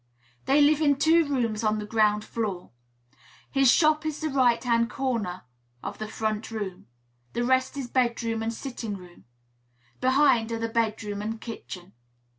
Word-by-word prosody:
They 280 +2 +4
live 300 +1 +4
in 285 -2 +4
two 320 +3 +4
rooms, 235 -6 -1
on 215 0 +2
the 210 - -4
ground 210 -1 +2
floor. 205 -6 -4 0.8
His 270 -2 +5
shop 310 0 +4
is 310 -1 -3
the 315 - -2
right 255 -4 +3
hand 235 -1 +2
corner 225 -9 -2 0.4
of - - -6
the 215 - -4
front 215 0 -3
room; 205 -5 -5 0.5
the 240 - -1
rest 260 +2 +1
is 270 -3 -3
bedroom 235 -2 0
and 225 +1 -1
sitting 230 -3 -5
room; 180 -2 -15 0.7
behind 255 -3 +3
are 230 - -1
the 230 0 -2
bedroom 215 -3 -1
and 220 +1 -4
kitchen. 195 -6 -8
230 Hz, 160 wpm, -26 LUFS, 215-265 Hz, 0.8 s, His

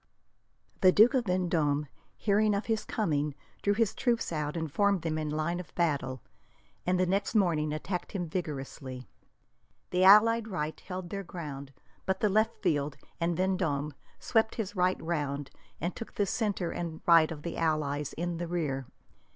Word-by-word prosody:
The 185 -2 +7
Duke 220 +6 +6
of 255 -3 +2
Vendome, 170 -6 +1 0.3
hearing 210 0 +2
of 200 - -2
his 225 -2 -1
coming, 150 -8 -1 0.3
drew 205 0 +2
his 225 -2 +2
troops 240 -6 0
out 150 0 -2
and 160 -3 -3
formed 200 -4 +2
them 155 -1 -1
in 155 -1 -2
line 155 +3 -1
of 180 - -10
battle, 140 -7 0 0.6
and 180 0 +2
the 185 - +4
next 195 +4 0
morning 165 -7 +2
attacked 175 +4 -4
him 180 -4 -2
vigorously. 135 -6 -5 0.8
The 180 +1 +2
allied 220 +3 +7
right 160 -6 -3
held 185 -2 -7
their 200 - -3
ground, 145 -7 -7 0.4
but 190 0 +1
the 210 - +2
left 215 +2 +1
fled, 145 -5 0 0.2
and 170 -1 0
Vendome 170 -6 0 0.3
swept 225 -1 +1
his 210 -3 -4
right 185 0 +2
round 145 -4 -2 0.3
and 175 +3 -2
took 230 - -8
the 205 - +2
centre 200 -3 -1
and 165 -2 -5
right 165 -2 +6
of 150 -2 -7
the 170 - -4
allies 150 -3 0
in 175 0 -3
the 175 0 -3
rear. 145 -7 -2
175 Hz, 165 wpm, -30 LUFS, 150-195 Hz, 0.8 s, The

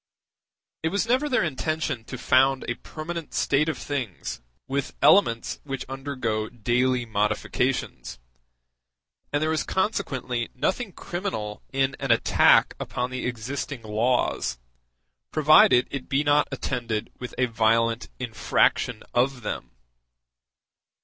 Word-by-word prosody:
It 160 - 0
was 200 +5 0
never 255 +6 +1
their 255 - +2
intention 155 -4 -2
to 125 - -7
found 135 +1 +3
a 120 - 0
permanent 160 +5 -7
state 150 +3 +2
of 160 - -2
things 125 - -4 0.3
with 140 +1 -2
elements 145 -7 +4
which 135 -2 -5
undergo 130 -5 -3
daily 125 +2 +1
modifications; 110 - -1 1.1
and 145 +1 +1
there 155 0 +1
is 160 - +1
consequently 130 - -1
nothing 195 - -1
criminal 175 - -5
in 135 0 +1
an 135 - -3
attack 115 -1 +5
upon 125 +1 -3
the 130 -1 -3
existing 125 +2 -4
laws, 110 - 0 0.7
provided 155 - +6
it 135 -2 -5
be 135 +2 +2
not 145 0 +3
attended 120 -5 -3
with 125 - -7
a 130 - +3
violent 115 -1 +1
infraction 120 -1 +1
of 125 0 +1
them. - - -4
130 Hz, 120 wpm, -25 LUFS, 115-150 Hz, 1.1 s, provided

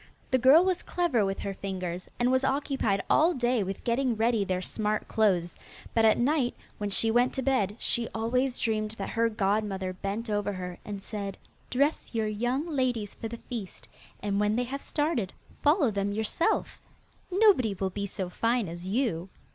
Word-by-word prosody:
The 260 - +4
girl 275 +8 +7
was 370 -2 +1
clever 335 -11 +1
with 195 0 -1
her 200 - -3
fingers, 185 -2 -5
and 245 +1 +3
was 260 +1 +2
occupied 270 -7 0
all 330 +3 +4
day 245 -2 +1
with 195 0 -4
getting 245 0 +1
ready 225 -1 +2
their 185 -2 -1
smart 210 +3 -2
clothes, 180 -6 +1 0.3
but 225 -1 +4
at 220 - +5
night 260 0 +1 0.2
when 205 -1 -2
she 225 +3 +2
went 245 +2 +3
to 265 - -2
bed 215 -7 +1
she 235 -1 +1
always 250 +3 0
dreamed 215 -1 -1
that 195 - -4
her 230 0 +2
godmother 200 -3 0
bent 200 +5 -4
over 205 -1 -1
her 180 -1 -6
and 200 -2 -6
said, 200 -3 -5 0.3
'Dress 280 -1 0
your 220 -1 +1
young 240 +8 -1
ladies 250 -9 -1
for 225 - -6
the 235 +1 -6
feast, 225 -6 -7 0.4
and 200 -1 0
when 210 +1 +2
they 245 - +1
have 275 +3 -5
started 295 - -1 0.3
follow 295 - +4
them 200 0 -1
yourself. 220 +11 0 0.5
Nobody 370 - +4
will 190 0 -2
be 200 +1 -3
so 190 -1 -4
fine 230 +4 0
as 175 +2 -7
you. 195 -5 0
225 Hz, 180 wpm, -28 LUFS, 200-255 Hz, 0.5 s, girl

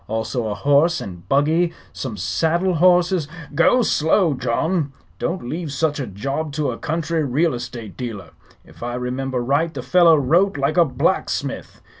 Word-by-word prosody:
Also 110 +2 -2
a 105 - -2
horse 145 +9 +3
and 90 -3 -9
buggy, 160 +5 +2 0.2
some 115 -6 -5
saddle 165 - 0
horses 175 -1 +3
" 150 - -14
"Go 250 +8 +4
slow, 160 -2 +2
John. 140 +5 -1 0.3
Don't 170 -7 -3
leave 160 +2 -4
such 145 +1 0
a 135 - -3
job 140 +10 -4
to 145 -2 -1
a 115 - -6
country 165 0 -1
real 150 +5 +1
estate 120 -4 -7
dealer. 105 -9 -6 0.3
If - - -18
I 120 +1 -3
remember 125 0 -2
right 145 +6 +1
the 135 -5 -6
fellow 165 +5 +5
wrote 165 +7 +2
like 140 +2 0
a 170 - +6
blacksmith. 130 - -2
145 Hz, 165 wpm, -21 LUFS, 125-165 Hz, 0.3 s, a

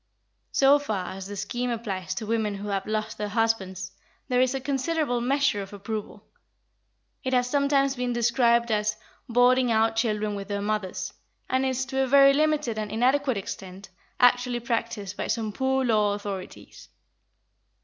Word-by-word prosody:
So 280 +1 +5
far 205 -10 -3
as 190 0 -7
the 205 - -6
scheme 240 +6 -3
applies 195 -6 -3
to 215 - -4
women 215 -2 -1
who 205 +1 -6
have 195 -1 -2
lost 215 0 -3
their 210 -1 -2
husbands, 195 -4 -1 0.4
there 250 0 +3
is 255 +1 +2
a - - -1
considerable 270 -1 -1
measure 270 -4 +1
of 195 +1 -9
approval; 210 +1 -6 1.0
it 260 -1 -2
has 250 -1 +3
sometimes 280 0 +2
been 250 -1 -2
described 235 0 +2
as 210 0 0 0.3
"boarding 245 +1 +4
out 225 0 +2
children 215 -2 0
with 200 -1 -5
their 205 -1 -2
mothers," 210 -3 -3 0.3
and 260 +1 +1
is, 260 0 -1
to 265 +2 -1
a 265 - +1
very 275 +1 +7
limited 300 -6 +1
and 210 -1 -4
inadequate 260 +2 +2
extent, 190 0 -7 0.3
actually 245 0 +3
practised 230 -4 -3
by - - -3
some 220 -3 -2
Poor 265 +1 +1
Law 210 -3 +2
authorities. 200 -2 -8
230 Hz, 160 wpm, -26 LUFS, 205-260 Hz, 1.0 s, very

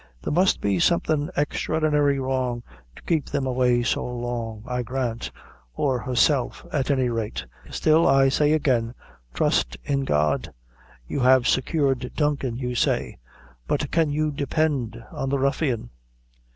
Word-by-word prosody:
There - - -2
must 185 +4 +3
be 100 -3 +1
something 155 - +1
extraordinary 150 -1 +1
wrong 130 -2 -1 0.3
to - - -15
keep 160 -5 0
them 135 - -2
away 125 -1 +2
so - - 0
long, 120 -3 -4
I 125 0 -2
grant 120 -1 -3 0.5
or 130 -3 0
herself, 130 +1 +1
at 140 -2 0
any 130 -3 +2
rate; 115 - -3 0.2
still, 160 +1 +3
I 135 0 +5
say 150 +2 +2
again, 125 -6 +1 0.4
trust - - +1
in 140 -1 0
God. 75 - +1 0.6
You - - -3
have 130 -1 +5
secured 135 -2 0
Duncan, 140 -5 0
you 125 -1 -3
say; 120 - 0 0.5
but - - -1
can 160 -2 +2
you 155 +1 0
depend 140 -5 -1
on 135 - -3
the 140 - +1
ruffian?" 135 -3 -1
130 Hz, 140 wpm, -24 LUFS, 120-145 Hz, 0.6 s, I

